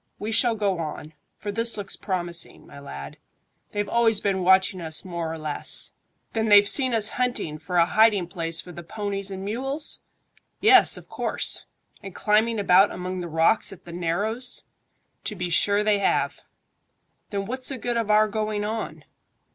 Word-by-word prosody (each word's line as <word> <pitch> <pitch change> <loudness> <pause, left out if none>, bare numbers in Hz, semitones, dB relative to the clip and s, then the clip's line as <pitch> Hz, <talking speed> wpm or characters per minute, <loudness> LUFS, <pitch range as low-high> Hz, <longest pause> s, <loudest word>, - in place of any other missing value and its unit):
We 215 +2 -4
shall 230 +1 +2
go 200 -4 -1
on; 155 -1 -6 0.2
for 205 - -5
this 230 +2 +3
looks 200 -2 -3
promising, 175 -3 -2
my - - -13
lad. 70 - -9 0.5
They've 205 0 -2
always 230 -3 +2
been 195 -2 -1
watching 190 0 +3
us 160 +2 -3
more 170 -3 -4
or 165 - -5
less." 155 -2 -1 0.4
"Then 220 -1 0
they've 205 0 +7
seen 260 +1 +4
us 215 -1 +3
hunting 200 -11 -2
for 175 +3 -3
a 170 - +6
hiding 210 -1 +3
place 165 -2 -2
for 180 - -8
the 175 - -9
ponies 200 +2 -2
and 190 0 -6
mules?" 270 +8 -3 0.6
"Yes, 400 -3 +6
of - - -12
course." - - 0 0.3
"And 195 -2 -10
climbing 220 +2 +2
about 195 0 +5
among 180 +1 -5
the 175 - -5
rocks 165 +8 +2
at 195 - -13
the 170 - -10
narrows?" 205 +9 0 0.6
"To 210 - -2
be 180 -2 -4
sure 205 +5 +2
they 210 -1 +2
have." 200 - 0 0.9
"Then 200 -1 -3
what's 255 +4 -2
the 270 - -3
good 240 0 -3
of 230 -2 -1
our 215 0 +5
going 215 -1 -2
on?" 220 +1 -5
200 Hz, 175 wpm, -24 LUFS, 175-220 Hz, 0.9 s, they've